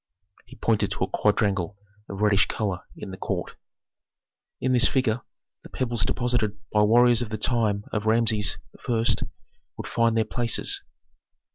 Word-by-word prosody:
He 130 - -13
pointed 115 -4 +1
to - - -2
a - - 0
quadrangle 100 -1 0 0.3
of 100 +1 -6
reddish 105 -2 +4
color 100 -4 -2 0.2
in - - -7
the 95 - -8
court. - - -4 1.0
"In 130 0 0
this 125 +1 +5
figure 125 -3 0 0.4
the - - -13
pebbles 120 -4 -1
deposited 120 -4 0
by 105 - +3
warriors 120 +2 +5
of 120 - -3
the 110 - -3
time 105 -2 0
of 105 0 -1
Rameses 110 -2 +2 0.3
I. 115 -1 +1 0.7
would - - -6
find 115 -1 +1
their 110 - +2
places. 115 +1 +1
110 Hz, 150 wpm, -25 LUFS, 105-120 Hz, 1.0 s, this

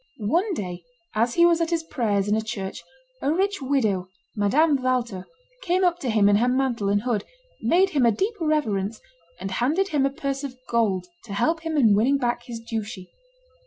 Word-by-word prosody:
One 340 - 0
day, 180 - -5 0.3
as 230 +2 +1
he 340 - +6
was 340 -1 +4
at 330 - +1
his 335 -1 0
prayers 210 -9 0
in 210 - +2
a 220 - +1
church, 195 -3 -5 0.4
a 280 - +1
rich 390 +2 0
widow, 220 -9 0 0.3
Madame 275 +8 +3
Walther, 245 -7 -1 0.3
came 365 -2 +1
up 355 -1 +2
to 260 - -3
him 215 -3 +4
in 205 0 +5
her 240 +3 +2
mantle 250 -5 0
and 205 +1 +1
hood, 230 -5 0 0.4
made 360 +11 +3
him 275 -7 +3
a - - +5
deep 390 - -1
reverence, 230 -10 0 0.4
and 195 - -5
handed 305 - +1
him 295 -3 +1
a - - -1
purse 275 0 -4
of 260 -2 -6
gold 205 -6 +1 0.2
to 205 - -7
help 320 +11 +1
him 320 -1 -3
in 225 -7 +5
winning 250 +7 +3
back 240 -3 -1
his 235 -2 -6
duchy. 220 -4 -6
245 Hz, 200 wpm, -24 LUFS, 210-310 Hz, 0.4 s, he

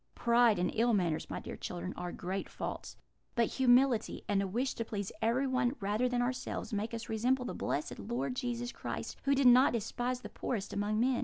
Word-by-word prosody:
Pride 235 -2 +4
and 180 - +1
ill 235 +1 +3
manners, 170 -5 0
my - - -3
dear - - -7
children, 180 +1 -5
are 175 0 -4
great 190 +2 -4
faults; - - -6 0.4
but 235 -2 +4
humility, 250 -2 +3
and 200 -1 +2
a 200 - -1
wish 245 +8 -1
to 230 - -3
please 205 -3 -4
everyone 255 +2 +1
rather 210 +5 +1
than 245 0 +1
ourselves, 250 -1 -3
make 215 +3 -2
us 230 - -6
resemble 250 +4 +1
the - - -3
blessed 150 - -3
Lord 240 +3 -2
Jesus 240 -1 -2
Christ, - - -5
who 280 0 +4
did 275 0 +2
not 250 +1 +7
despise 245 +3 -2
the - - -8
poorest 210 -5 -3
among 205 +1 0
men. 250 +1 +2
235 Hz, 200 wpm, -33 LUFS, 205-250 Hz, 0.4 s, not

